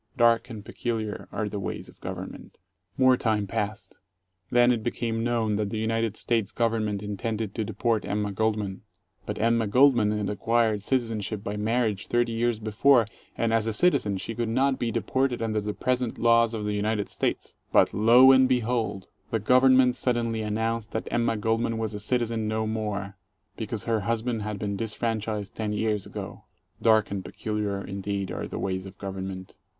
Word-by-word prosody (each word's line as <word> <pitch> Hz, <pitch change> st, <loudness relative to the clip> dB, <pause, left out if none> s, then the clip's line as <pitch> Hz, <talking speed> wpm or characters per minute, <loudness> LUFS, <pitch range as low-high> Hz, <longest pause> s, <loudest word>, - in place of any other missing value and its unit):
Dark 115 Hz, +1 st, +4 dB
and 105 Hz, -4 st, -8 dB
peculiar 110 Hz, -3 st, -4 dB
are 105 Hz, 0 st, -2 dB
the 105 Hz, 0 st, -4 dB
ways 95 Hz, -, -5 dB
of -, -, -17 dB
Government. -, -, -8 dB, 0.4 s
More 130 Hz, -1 st, +5 dB
time 110 Hz, -4 st, 0 dB
passed. 105 Hz, 0 st, -4 dB, 0.5 s
Then 120 Hz, 0 st, +5 dB
it 120 Hz, -2 st, 0 dB
became 115 Hz, 0 st, -2 dB
known 115 Hz, -3 st, 0 dB
that 105 Hz, -1 st, -1 dB
the 110 Hz, -, -4 dB
United 115 Hz, 0 st, -1 dB
States 115 Hz, -4 st, 0 dB
Government 110 Hz, -3 st, 0 dB
intended 105 Hz, +1 st, -3 dB
to 110 Hz, -, -2 dB
deport 110 Hz, +1 st, 0 dB
Emma 105 Hz, 0 st, -2 dB
Goldman. 105 Hz, -2 st, -1 dB, 0.5 s
But -, -, -4 dB
Emma 115 Hz, 0 st, +2 dB
Gold 130 Hz, +5 st, +5 dB
man 105 Hz, -3 st, +2 dB
had 105 Hz, -1 st, -1 dB
acquired 110 Hz, 0 st, +1 dB
citizenship 110 Hz, -3 st, -1 dB
by 105 Hz, -1 st, -3 dB
marriage 110 Hz, -1 st, 0 dB
30 120 Hz, -1 st, +1 dB
years 115 Hz, 0 st, 0 dB
before, 115 Hz, +3 st, +4 dB, 0.3 s
and, 115 Hz, -1 st, +1 dB
as 115 Hz, -1 st, +2 dB
a 110 Hz, -, 0 dB
citizen, 105 Hz, -, +2 dB
she 110 Hz, +4 st, -5 dB
could 115 Hz, -1 st, -2 dB
not 130 Hz, +3 st, +1 dB
be 120 Hz, -, 0 dB
deported 130 Hz, +2 st, 0 dB
under 110 Hz, -2 st, -1 dB
the 105 Hz, +1 st, -3 dB
present 125 Hz, +1 st, -1 dB
laws 115 Hz, 0 st, +4 dB
of 105 Hz, -1 st, -4 dB
the 105 Hz, -, -1 dB
United 105 Hz, 0 st, -1 dB
States. -, -, -3 dB, 0.2 s
But -, -, +4 dB
lo 120 Hz, +5 st, +7 dB
and 130 Hz, -1 st, +5 dB
behold! 120 Hz, -6 st, 0 dB, 0.2 s
The 115 Hz, -, 0 dB
Government 125 Hz, +2 st, +5 dB
suddenly 115 Hz, -3 st, 0 dB
announced 110 Hz, +1 st, -2 dB
that 110 Hz, -, -3 dB
Emma 115 Hz, -1 st, +1 dB
Goldman 115 Hz, +1 st, 0 dB
was 110 Hz, -1 st, -2 dB
a 105 Hz, -, -4 dB
citizen 115 Hz, 0 st, -1 dB
no 110 Hz, 0 st, -1 dB
more, 105 Hz, -2 st, -3 dB, 0.4 s
because 110 Hz, -1 st, -4 dB
her 115 Hz, -2 st, +1 dB
husband 115 Hz, +2 st, -1 dB
had 105 Hz, 0 st, -4 dB
been 100 Hz, 0 st, -3 dB
disfranchised 110 Hz, -1 st, -3 dB
ten 105 Hz, -1 st, -3 dB
years 105 Hz, -1 st, 0 dB
ago! -, -, -8 dB, 0.4 s
Dark 110 Hz, -2 st, +4 dB
and 100 Hz, -2 st, -3 dB
peculiar 105 Hz, +1 st, -3 dB
indeed 100 Hz, 0 st, -3 dB
are -, -, -4 dB
the -, -, -6 dB
ways 95 Hz, 0 st, -3 dB
of 95 Hz, +1 st, -13 dB
government. 95 Hz, -1 st, -6 dB
110 Hz, 175 wpm, -26 LUFS, 105-115 Hz, 0.5 s, lo